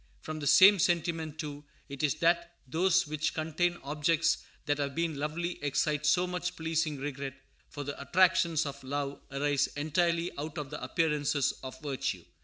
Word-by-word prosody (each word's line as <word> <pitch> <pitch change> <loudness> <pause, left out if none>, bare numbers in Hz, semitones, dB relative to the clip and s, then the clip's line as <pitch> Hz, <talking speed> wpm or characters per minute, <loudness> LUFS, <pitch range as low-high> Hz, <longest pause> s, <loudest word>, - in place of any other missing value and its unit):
From 155 - -6
the 145 - -3
same 200 +5 +8
sentiment, 165 -2 0
too, 145 -2 -6 0.2
it 140 -2 -7
is 150 -3 +2
that 170 +1 +2
those 180 +6 +3
which 155 0 -2
contain 165 +3 0
objects 150 +3 +1 0.3
that 145 0 0
have 140 -1 -2
been 165 -4 -1
lovely 165 +3 -3
excite 150 +1 0
so 175 +5 +4
much 180 0 -3
pleasing 160 -2 -1
regret; 135 -1 -5 0.3
for 145 - -6
the 145 0 -6
attractions 170 -1 +3
of 140 -1 -6
love 140 +1 -3
arise 140 0 +1
entirely 170 +3 +1
out 155 +2 -5
of 145 -3 -5
the - - -6
appearances 145 0 +1
of 130 -1 -8
virtue. 140 -4 -3
155 Hz, 165 wpm, -30 LUFS, 145-170 Hz, 0.3 s, same